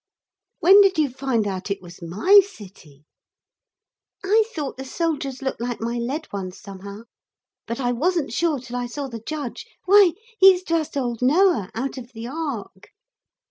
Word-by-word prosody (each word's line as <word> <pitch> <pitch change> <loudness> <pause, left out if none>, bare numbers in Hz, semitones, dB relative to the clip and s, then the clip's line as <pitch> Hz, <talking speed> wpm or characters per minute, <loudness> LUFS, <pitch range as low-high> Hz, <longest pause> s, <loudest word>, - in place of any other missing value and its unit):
'When 390 +4 +8
did 390 -3 +3
you 300 -4 +2
find 255 -4 -1
out 190 0 -4
it 200 0 -2
was 180 -1 -14
my 210 - +5
city?' 185 - -15 1.2
'I 430 +3 +4
thought 295 - -4
the 265 - -6
soldiers 280 -2 -3
looked 265 -3 -3
like 245 0 -3
my 235 +1 -3
lead 275 +7 -3
ones 185 -2 -5
somehow. 200 +2 -10 0.6
But 230 - -4
I 245 -2 0
wasn't 325 +5 0
sure 335 -4 +1
till 245 -1 -7
I 245 0 -3
saw 275 +3 -5
the 230 -3 -8
judge. 285 0 -6 0.2
Why 390 -3 +6 0.3
he's 375 -1 +7
just 320 -4 -1
old 240 -3 -2
Noah, 270 - +3
out 260 +3 -3
of 245 0 -12
the 225 0 -7
Ark.' 250 -9 -6
260 Hz, 165 wpm, -23 LUFS, 225-325 Hz, 1.2 s, When